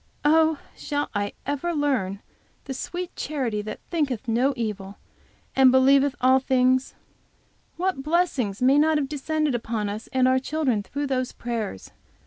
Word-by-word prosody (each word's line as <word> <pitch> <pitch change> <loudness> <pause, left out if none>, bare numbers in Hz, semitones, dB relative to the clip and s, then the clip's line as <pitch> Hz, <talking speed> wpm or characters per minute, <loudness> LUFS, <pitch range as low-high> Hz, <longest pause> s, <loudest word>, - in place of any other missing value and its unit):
Oh, 320 +1 +4 0.2
shall 290 0 -3
I 205 -1 -2
ever 290 +5 -2
learn 250 - -1 0.4
the 270 - -5
sweet 355 +6 -5
charity 255 -8 -2
that 215 +1 -7
thinketh 280 - -1
no 240 +4 +2
evil, 205 -3 -4 0.6
and 265 -1 +6
believeth 275 +2 +4
all 260 +1 +5
things? 260 0 +2 0.8
What 365 -6 -1
blessings 275 - 0
may 270 +3 +5
not 310 +1 +3
have 285 -2 -1
descended 305 +1 -1
upon 225 -3 -2
us 210 +2 -6
and 260 -1 +3
our 260 0 +3
children 265 -5 0
through 285 +8 -4
those 255 -2 -1
prayers! 225 - -5
265 Hz, 145 wpm, -25 LUFS, 235-295 Hz, 0.8 s, and